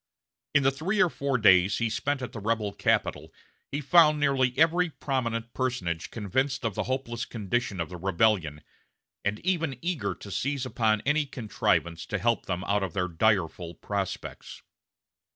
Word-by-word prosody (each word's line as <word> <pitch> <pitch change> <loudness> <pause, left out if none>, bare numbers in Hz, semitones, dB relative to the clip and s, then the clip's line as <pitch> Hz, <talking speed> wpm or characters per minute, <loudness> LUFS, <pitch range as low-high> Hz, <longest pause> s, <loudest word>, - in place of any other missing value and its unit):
In 140 - +5
the 135 - +4
three 175 +10 -2
or 180 -5 +4
four 140 -2 -1
days 95 -3 +5
he 115 - +1
spent 145 +4 -2
at 125 - -5
the 110 - -7
rebel 105 -1 -1
capital - - 0 0.4
he 145 - -2
found 155 0 +5
nearly 135 -3 +2
every 165 +3 +4
prominent 115 -6 -3
personage 95 -11 -2
convinced 130 +5 -1
of 110 - 0
the - - -2
hopeless 125 -3 -2
condition 105 -2 -2
of 85 - -2
the 90 - -7
rebellion, 90 -4 +1 0.6
and 100 +1 0
even 165 -7 0
eager 175 -4 -1
to 100 - -10
seize 135 +4 -1
upon 110 -4 +1
any 150 +1 +1
contrivance 105 - -1
to 100 - -1
help 115 +1 0
them 90 0 -2
out 100 +1 +1
of 95 -4 -3
their 90 -2 0
direful 85 -2 0
prospects. 100 0 -5
115 Hz, 165 wpm, -27 LUFS, 100-140 Hz, 0.6 s, In